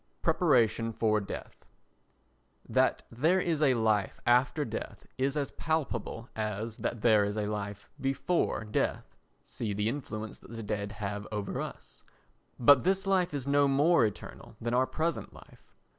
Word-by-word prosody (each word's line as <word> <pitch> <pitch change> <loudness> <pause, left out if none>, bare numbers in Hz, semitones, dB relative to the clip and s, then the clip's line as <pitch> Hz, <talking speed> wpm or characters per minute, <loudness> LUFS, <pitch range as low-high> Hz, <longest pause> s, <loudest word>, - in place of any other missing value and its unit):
Preparation 115 0 +3
for 110 -1 +2
Death 100 - -8 1.0
That - - +2
there 160 +11 +2
is 165 -4 0
a 135 -4 +4
life 110 -3 +1
after 130 +5 +3
death 110 - -6
is 135 +3 +1
as 140 -2 -1
palpable 130 -7 -2
as 110 +1 -3
that 115 - -3
there 110 -3 +5
is 105 +1 -2
a 105 - 0
life 105 -1 -4
before 135 0 0
death—see 105 0 -4
the 105 +1 0
influence 110 -4 -4
that - - -16
the 115 - -5
dead 105 -1 -3
have 105 0 -4
over 105 -2 -3
us—but 130 +2 0
this 190 +2 +1
life 185 -2 +2
is 140 -3 -4
no 140 0 +4
more 145 +3 +4
eternal 105 -2 -5
than 120 +1 -2
our 130 +1 +3
present 165 +1 -2
life. - - -17
115 Hz, 145 wpm, -30 LUFS, 105-145 Hz, 1.0 s, there